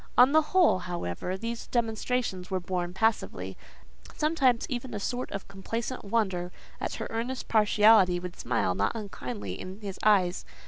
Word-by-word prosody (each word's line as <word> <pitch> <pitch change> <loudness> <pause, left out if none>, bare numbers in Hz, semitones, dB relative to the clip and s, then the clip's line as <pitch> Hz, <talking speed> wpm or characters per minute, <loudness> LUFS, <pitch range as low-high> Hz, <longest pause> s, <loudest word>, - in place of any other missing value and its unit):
On 250 +2 +8
the 315 +1 +6
whole, 320 - +3
however, 175 - -4
these 230 +3 -5
demonstrations 225 -4 -1
were 190 -1 0
borne 175 0 -2
passively: 220 +4 -1 0.6
sometimes 280 -6 +2
even 245 -2 -4
a - - -2
sort 245 +5 -3
of 195 - -6
complacent 230 +6 -4
wonder 190 -5 0 0.3
at - - -3
her - - -4
earnest 240 +3 -3
partiality 210 -4 +5
would 180 0 -7
smile 115 -6 0
not 100 +3 0
unkindly 125 - -5
in 185 +2 -8
his 195 -2 -6
eyes. 190 -4 +3
205 Hz, 150 wpm, -28 LUFS, 180-235 Hz, 0.6 s, On